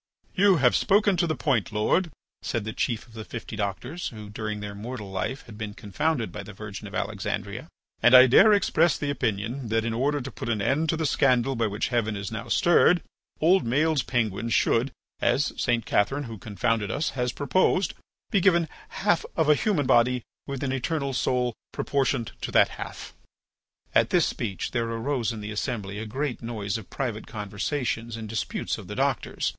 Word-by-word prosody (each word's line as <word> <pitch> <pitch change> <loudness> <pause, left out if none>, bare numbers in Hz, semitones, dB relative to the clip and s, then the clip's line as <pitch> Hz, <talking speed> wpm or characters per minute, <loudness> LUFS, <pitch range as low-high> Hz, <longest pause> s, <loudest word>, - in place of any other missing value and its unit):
"You 195 0 +5
have 130 -6 +4
spoken 200 0 +3
to 170 - +2
the 155 - 0
point, 120 -4 0
Lord," 110 - +1 0.3
said 115 -4 -2
the 110 - -4
chief 115 -3 -1
of 115 - -20
the 110 -1 -7
fifty 115 +1 -7
doctors, 110 - -3
who, 105 -3 -8
during 105 0 -4
their 105 0 -6
mortal 105 -1 -7
life 95 +8 -3
had 110 -3 -12
been 105 -2 -5
confounded 120 +5 -1
by 105 - -6
the 105 +1 -10
Virgin 105 +1 -8
of 100 - -9
Alexandria, 105 - -3 0.3
"and 120 +1 +7
I 130 0 +11
dare 130 - +7
express 170 -6 +3
the 145 -1 -2
opinion 115 +1 -2
that, 115 0 +1
in 115 - -1
order 140 +5 +1
to 135 0 -6
put - - -6
an 110 -2 0
end 135 +10 +1
to 165 - +1
the 160 - -1
scandal 135 -2 +2
by 115 -2 +1
which 105 +1 -2
heaven 115 -3 0
is 100 0 -5
now 115 +2 -5
stirred, 175 +6 +4 0.4
old 180 +5 +4
Maël's 150 +5 +2
penguins 115 -2 -1
should, 125 +4 +2 0.3
as 145 - +2
St. 120 -3 0
Catherine 135 +8 +1
who 115 -5 -8
confounded 105 +2 -1
us 150 +10 -1
has 125 -2 -1
proposed, 185 +7 +1 0.4
be 200 - +3
given 170 -3 +4 0.2
half 195 -4 +1
of 160 -2 +2
a - - +8
human 155 -2 +1
body 125 -1 +3 0.2
with 140 -1 -4
an 135 - -1
eternal 140 +1 -1
soul 125 -1 +1 0.2
proportioned 135 -4 0
to - - -3
that - - +5
half." - - -8 0.8
At - - +4
this - - +4
speech 100 -5 -3
there 115 -2 -1
arose 115 0 -1
in 110 -2 -6
the 105 +1 -5
assembly 105 -3 -3
a 110 - -5
great 135 +3 -3
noise 110 -3 -3
of 105 - -13
private 120 -5 -4
conversations 115 +3 -3
and 110 -1 -6
disputes 110 0 -3
of - - -10
the - - -6
doctors. - - 0
120 Hz, 195 wpm, -26 LUFS, 105-140 Hz, 0.8 s, I